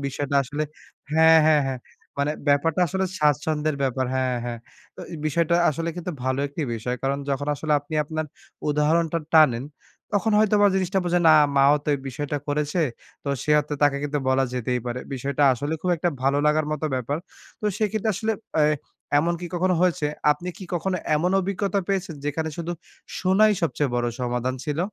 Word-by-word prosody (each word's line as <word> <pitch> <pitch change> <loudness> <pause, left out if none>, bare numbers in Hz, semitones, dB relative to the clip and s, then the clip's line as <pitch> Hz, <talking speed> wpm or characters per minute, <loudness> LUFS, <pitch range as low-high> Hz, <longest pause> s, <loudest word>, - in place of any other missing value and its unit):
বিষয়টা 140 +1 -2
আসলে 145 +4 -4 0.5
হ্যাঁ, 160 +1 +7
হ্যাঁ, 155 -1 +5
হ্যাঁ। 130 -1 -3 0.4
মানে 140 +1 +1 0.2
ব্যাপারটা 150 +4 +2
আসলে 190 +5 -1
স্বাচ্ছন্দের 150 +1 +1
ব্যাপার 130 -1 0
হ্যাঁ, 130 -1 0
হ্যাঁ। 120 -1 -4 0.4
ত - - -27
এ - - -4
বিষয়টা 165 +2 +1 0.2
আসলে 165 +3 -3
কিন্তু 175 0 -4
ভালো 130 +1 0
একটি 150 +3 -4
বিষয়। 125 +2 -3
কারণ 135 +1 0
যখন 140 +1 -2
আসলে 150 +2 -2
আপনি 145 +2 -8
আপনার 155 +1 -3 0.4
উদাহরণটা 160 +3 +2 0.2
টানেন, 130 -6 +5 0.5
তখন 210 +2 +1
হয়তোবা 210 -1 +4
জিনিসটা 190 0 +1
বোঝে 175 0 +2
না, 155 - +8 0.2
মাও 140 +1 +6
তো - - -5
এই 140 - -3
বিষয়টা 145 +3 -3
করেছে। 150 +4 0 0.4
তো - - -3
সে 150 - -2
অর্থে 150 0 -5
তাকে 145 -1 +4
কিন্তু 145 0 -1
বলা 130 0 +3
যেতেই 125 0 -1
পারে। 120 +1 -3
বিষয়টা 140 +2 -1
আসলে 145 +5 -3
খুব 180 - 0
একটা 170 +2 0
ভালো 135 +2 +2
লাগার 150 0 +2
মত 155 - -4
ব্যাপার। 130 +3 -2 0.4
তো - - -8
সেক্ষেত্রে 215 0 0
আসলে 220 +4 -1 0.3
এ - - +5 0.5
এমনকি 170 +3 -1
কখনো 180 +1 +2
হয়েছে 170 -5 +2 0.3
আপনি 175 +5 -8
কি 190 - -8
কখনো 185 +2 -1 0.2
এমন 175 +4 +1
অভিজ্ঞতা 200 +1 -1
পেয়েছেন 195 -3 -1
যেখানে 160 +2 -2
শুধু 170 0 -3 0.5
শোনাই 200 +4 +4
সবচেয়ে 150 -4 0
বড় 120 0 0
সমাধান 125 +1 -1
ছিল? 150 -1 -3
150 Hz, 175 wpm, -24 LUFS, 140-175 Hz, 0.5 s, না